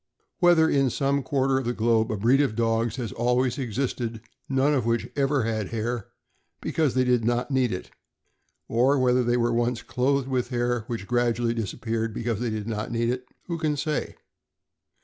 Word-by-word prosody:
Whether 175 -3 +5
in 135 -3 +2
some 140 +3 0
quar 135 0 0
ter 135 -1 +2
of 135 - -5
the 120 - 0
globe 110 -1 +2
a 110 - -1
breed 120 +7 +4
of 135 -7 0
dogs 115 0 +1
has 120 -5 -4
always 125 +2 +1
existed 120 -2 -3 0.3
none 135 +2 +2
of 135 - +1
which 115 0 0
ever 140 -2 +1
had 110 -3 -1
hair, 115 0 -3 0.5
because 150 -6 0
they 130 - +3
did 125 -2 +2
not 120 +4 0
need 130 -3 +2
it, 90 - -5 0.8
or 130 +5 +3
whether 125 -1 +3
they 120 0 +2
were 120 0 +1
once 120 0 0
clothed 135 +1 0
with 125 -2 0
hair, 120 -2 -1
which 115 -5 -4
gradually 120 0 +1
disappeared 115 0 -3
because 115 -3 -2
they 120 -1 -1
did 110 -1 -3
not 110 0 -3
need 115 0 +1
it, 125 0 -5 0.2
who 170 -2 -4
can 155 -2 0
say 150 +1 -2
120 Hz, 190 wpm, -26 LUFS, 115-135 Hz, 0.8 s, Whether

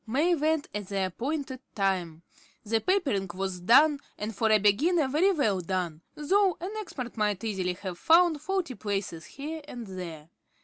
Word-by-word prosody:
May 295 +10 +2
went 315 -1 +1
at 205 -2 -4
the 195 -1 -1
appointed 260 - -3 0.2
time. 180 -5 -1 0.4
The 225 +1 0
papering 280 - +1
was 190 -1 -3
done, 280 - +5 0.2
and 215 +1 -4
for 220 +2 +1
a 215 - +6
beginner 275 - +3
very 315 +9 +3
well 220 - +1
done, 175 -3 -3
though 375 +5 +2
an 365 +4 -5
expert 255 - -6
might 210 -2 0
easily 190 -5 -1
have 180 -1 -7
found 330 -2 +4
faulty 360 -4 -2
places 195 -7 -4
here 310 +3 -6
and 240 -5 -7
there. 170 -5 -8
225 Hz, 165 wpm, -28 LUFS, 190-310 Hz, 0.4 s, a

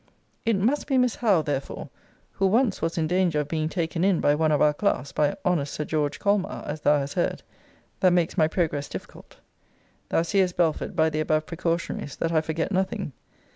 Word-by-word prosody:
It 230 - +4
must 240 +10 0
be 270 -3 +2
Miss 250 -2 +2
Howe, 200 -9 +3
therefore, 140 -2 -4 0.4
[who 195 - +1
once 225 +1 +2
was 165 +1 -1
in 160 - +1
danger 175 -2 +1
of 145 - -5
being 155 0 -1
taken 165 -1 -2
in 190 -3 +3
by 145 - +3
one 155 +1 +2
of 150 - +3
our 150 -1 +4
class, 145 -6 -1
by 150 -1 +1
honest 160 -6 0
Sir 150 - -3
George 145 -2 -1
Colmar, 200 -1 0
as 150 +1 -5
thou 150 0 +4
hast 140 0 -3
heard,] 175 - -1 0.6
that 185 - +4
makes 175 -2 +1
my 155 - +4
progress 155 -4 -1
difficult. - - -10 0.7
Thou 165 - +2
seest, 185 +1 +1
Belford, 165 -3 0
by 160 0 +3
the 155 - -2
above 155 0 +1
precautionaries, 165 -4 -3
that 165 - -1
I 160 -2 +3
forget 160 +4 -2
nothing. 190 -2 -1
165 Hz, 200 wpm, -25 LUFS, 155-190 Hz, 0.7 s, It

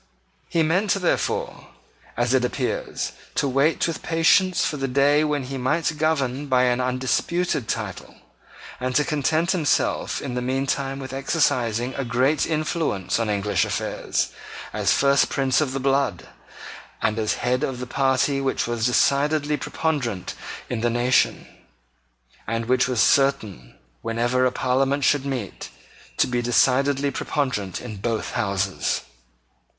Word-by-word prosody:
He 165 - +2
meant, 185 +6 +1
therefore, 185 -3 -1 0.5
as 120 +1 +1
it 130 -2 +3
appears, 125 - -2 0.2
to - - +1
wait 140 +4 +2
with 165 - -4
patience 175 +3 +3
for 150 - -2
the 135 -1 -2
day 140 +3 +3
when 150 -2 0
he 135 +1 -5
might 155 +5 0
govern 145 -3 0
by 130 -2 +3
an 125 0 +2
undisputed 130 +3 -1
title, - - -4 0.6
and 130 0 -2
to 150 - +4
content 155 +4 +1
himself 165 -7 0
in 135 -3 -5
the 125 - -2
meantime 135 +1 -1
with 135 -1 -7
exercising 130 -4 0
a 135 - -3
great 130 +5 +1
influence 155 - -1
on 115 -2 -1
English 105 0 +1
affairs, - - -2 0.4
as - - +1
first 140 -1 +3
Prince 135 0 +1
of 145 -4 0
the 135 - -3
blood, 135 -8 0 0.7
and 110 0 0
as 110 -1 0
head 125 +1 0
of 130 -4 -2
the 125 - -4
party 135 +2 +1
which 135 -1 0
was 120 -1 0
decidedly 145 +4 +2
preponderant 135 - -2 0.3
in 115 -2 -3
the 120 - +2
nation, 120 +2 +2 1.0
and 115 +1 -2
which 125 +2 +2
was 125 -3 -1
certain 110 - +1 0.3
whenever 120 +3 +1
a - - -1
Parliament 135 +3 0
should 140 0 +2
meet, 125 -8 -5 0.5
to - - +4
be 125 -1 -1
decidedly 135 +4 +2
preponderant 125 -9 -2
in 110 -4 -7
both 115 +2 -2
Houses. 100 -2 -1
130 Hz, 145 wpm, -23 LUFS, 120-145 Hz, 1.0 s, to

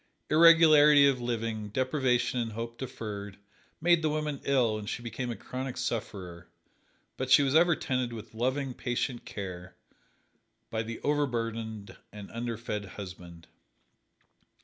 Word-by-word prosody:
Irregularity 155 -3 +7
of 135 -3 +2
living, 115 -3 -3
deprivation 130 +1 0
and 115 -2 -3
hope 115 +1 -6
deferred, 105 -6 -6 0.4
made 170 0 +4
the 155 - +1
woman 150 -2 -2
ill 120 -6 +2
and 105 0 -6
she 120 - -4
became 120 +1 -4
a 120 - -3
chronic 130 +2 -6
sufferer. 90 -7 -4 0.7
But - - -3
she 145 - +7
was 135 -1 +1
ever 170 +1 +5
tended 130 -4 -2
with 115 -2 -9
loving, 130 +3 -1
patient 120 0 -3
care 90 -2 -7 1.0
by 110 - -1
the 115 +1 -6
overburdened 115 -7 -2 0.2
and 105 -1 -10
underfed 115 -3 -4
husband. 90 -4 -9
120 Hz, 130 wpm, -29 LUFS, 110-135 Hz, 1.0 s, Irregularity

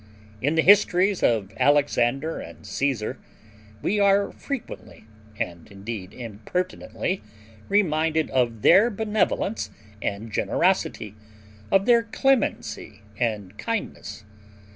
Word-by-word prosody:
In 145 +5 +1
the 160 - +3
histories 195 -1 +5
of 105 -4 +1
Alexander 145 0 +2
and - - -11
Caesar 130 -6 -2 0.6
we 210 +2 +1
are 200 0 +3
frequently, 275 - -7 0.3
and 85 +1 -4
indeed 100 -1 -7
impertinently, 130 - -4 0.5
reminded 160 -5 +2
of 120 -4 0
their 200 +7 +7
benevolence 215 -1 -1 0.3
and 105 +3 -4
generosity, 105 +1 0 0.6
of 195 0 +4
their 235 -1 +5
clemency 235 - -1 0.2
and 105 -5 -2
kindness. 105 - -4
155 Hz, 100 wpm, -24 LUFS, -, 0.6 s, their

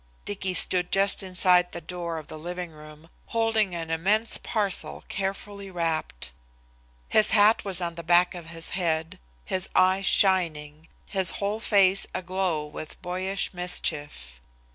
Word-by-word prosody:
Dicky 190 -2 -2
stood 180 +1 +3
just 195 +1 +2
inside 180 -1 +2
the 170 - -5
door 170 0 -5
of 155 - -7
the 155 - -9
living 175 +1 -6
room, 155 +1 -14 0.2
holding 225 -5 +1
an 165 -1 -5
immense 205 +8 +1
parcel 205 -4 -1
carefully 195 +1 -4
wrapped. 165 - -3 0.8
His 215 - +5
hat 210 +1 +5
was 190 -2 -1
on 170 -1 -2
the 170 0 -8
back 175 +2 +4
of 175 -2 -9
his 165 -1 -4
head, 165 -3 -2 0.3
his 185 -1 -1
eyes 185 +1 +3
shining, 160 -5 +2 0.2
his 190 -2 +4
whole 205 +2 -2
face 195 -3 +3
aglow 185 -4 -1
with 150 +1 -8
boyish 185 +3 -2
mischief. 145 - -3
180 Hz, 140 wpm, -26 LUFS, 165-195 Hz, 0.8 s, His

